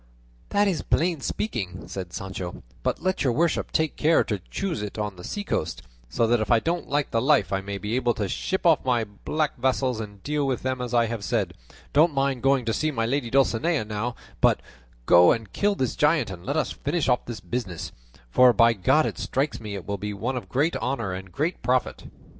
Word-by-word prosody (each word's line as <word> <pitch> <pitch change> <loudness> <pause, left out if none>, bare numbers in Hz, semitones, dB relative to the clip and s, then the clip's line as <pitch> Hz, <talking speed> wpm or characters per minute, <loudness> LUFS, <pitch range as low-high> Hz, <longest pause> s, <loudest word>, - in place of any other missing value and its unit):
"That 205 0 +3
is 180 -6 0
plain 170 -3 +1
speaking," 105 -5 -3
said 90 -3 -6
Sancho; 95 -1 -6 0.2
"but - - -2
let 185 -2 0
your 130 -4 +2
worship 165 +5 +1
take 160 -1 0
care 160 +2 +4
to 105 -3 -2
choose 185 - -2
it 105 0 -5
on 105 -2 -3
the 90 - -11
seacoast, 205 - -3 0.3
so 115 - +1
that 120 +1 +3
if 110 - -2
I 120 -2 +5
don't 170 +7 -2
like 145 0 0
the 115 - +1
life, 130 - +3
I 95 - 0
may 100 +1 -5
be 105 +4 -3
able 120 -2 +1
to 105 -4 -1
ship 190 - -2
off 165 -3 +5
my 125 -3 +2
black 145 +9 -3
vassals 130 -1 +1
and 105 -3 -8
deal 145 -1 0
with 130 -2 -1
them 130 -1 -1
as 125 -1 -2
I 120 -1 +4
have 115 -2 -4
said; - - 0 0.4
don't 155 +1 +4
mind 135 -2 +1
going 135 -1 +3
to 115 - 0
see 155 - 0
my 115 -6 -1
lady 125 0 -1
Dulcinea 135 +2 +2
now, 110 +3 -3 0.3
but - - +4 0.5
go 85 +4 +7
and 115 -4 -2
kill 205 0 +1
this 130 -9 -1
giant 150 -7 +2
and 90 -2 -8
let 140 +3 0
us 155 - 0
finish 150 +2 -1
off 125 -2 +2
this 120 -3 -6
business; 105 -8 -4 0.4
for 125 - +6
by 115 -1 +5
God 130 +10 +3
it - - -4
strikes 140 +3 -1
me 105 -2 -6
it 95 - -7
will 100 -1 -3
be 105 +1 -4
one 120 +6 -2
of 125 - -5
great 150 +6 +1
honour 115 -7 -2
and 95 0 -7
great 160 - -2
profit." 125 +1 0
120 Hz, 220 wpm, -25 LUFS, 105-145 Hz, 0.5 s, go